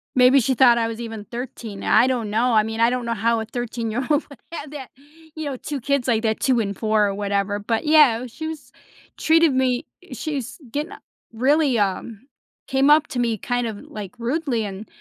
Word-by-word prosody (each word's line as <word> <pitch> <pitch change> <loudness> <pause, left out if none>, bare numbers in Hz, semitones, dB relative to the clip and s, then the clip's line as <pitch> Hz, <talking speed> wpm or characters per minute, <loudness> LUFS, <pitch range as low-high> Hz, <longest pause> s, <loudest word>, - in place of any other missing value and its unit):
Maybe 255 +2 +6
she 260 +2 +1
thought 245 -2 +5
I 230 -1 +1
was 230 +1 -6
even 225 -3 -7
13. 235 -3 -7
I - - +5
don't 245 -5 -1
know. 230 +4 +1
I 215 - +6
mean, 225 +1 -5
I 230 +1 +5
don't 250 -1 -2
know 230 0 -1
how 230 +2 +1
a 220 - -4
thirteen-year 240 +1 -3
old 300 0 +2
would 280 - -13
have 305 -3 -6
that, 280 -4 -8 0.5
you 315 -1 -5
know, 275 -3 -4
2 285 +1 -5
kids 280 0 0
like 225 -3 +2
that, 220 -1 0
2 255 -3 +2
and 200 -2 -2
4 215 -2 +2
or 200 - -3
whatever, 200 0 -1
but, 225 +8 -2
yeah, 290 -6 +5
she 315 +7 -7
was 315 -2 -8 0.5
treated 325 -3 +4
me 255 -1 +1 0.2
i 345 - -11
she's 275 -2 -5
gonna 295 +5 -4 0.3
really, 265 +2 +2
um, 205 +4 -2 0.4
came 270 +1 +2
up 300 0 +5
to 245 - -4
me, 230 -2 0
kind 245 +3 -1
of, 215 - -5
like, 205 -1 -8
rudely, 250 -2 -1
and 195 +2 -7
240 Hz, 210 wpm, -22 LUFS, 220-275 Hz, 0.5 s, Maybe